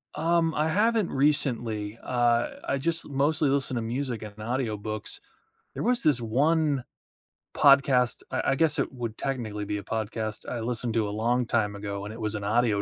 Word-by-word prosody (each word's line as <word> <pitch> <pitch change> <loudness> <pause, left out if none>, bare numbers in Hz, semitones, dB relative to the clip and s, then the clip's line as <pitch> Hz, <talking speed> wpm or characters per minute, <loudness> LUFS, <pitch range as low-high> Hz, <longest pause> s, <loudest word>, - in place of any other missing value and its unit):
Um, 165 0 +2
I 155 +1 +1
haven't 215 +3 +2
recently, 120 -7 0
uh, 120 -1 +2 0.2
I 140 - +1
just 165 +4 -1
mostly 140 +1 +1
listen 135 -2 0
to 120 - -1
music 120 0 -3
and 105 -1 -9
audiobooks. 110 -2 -3 0.6
There - - -4
was 245 +1 +1
this 145 -7 +3
one 145 +4 +1 0.7
podcast, 135 -3 +4
I - - 0
I 135 - +2
guess 155 0 +2
it - - 0
would 120 -3 -5
technically 110 -6 -3
be 105 +1 -2
a 100 - -6
podcast, 110 -1 -4
I 120 - -3
listened 120 0 -2
to 110 -2 +2
a - - -3
long 120 +4 +1
time 105 -3 0
ago 100 -1 -5
and 105 - -6
it 115 - -9
was 110 0 -1
an 100 - -4
audio 110 -1 +2
120 Hz, 185 wpm, -27 LUFS, 110-140 Hz, 0.7 s, podcast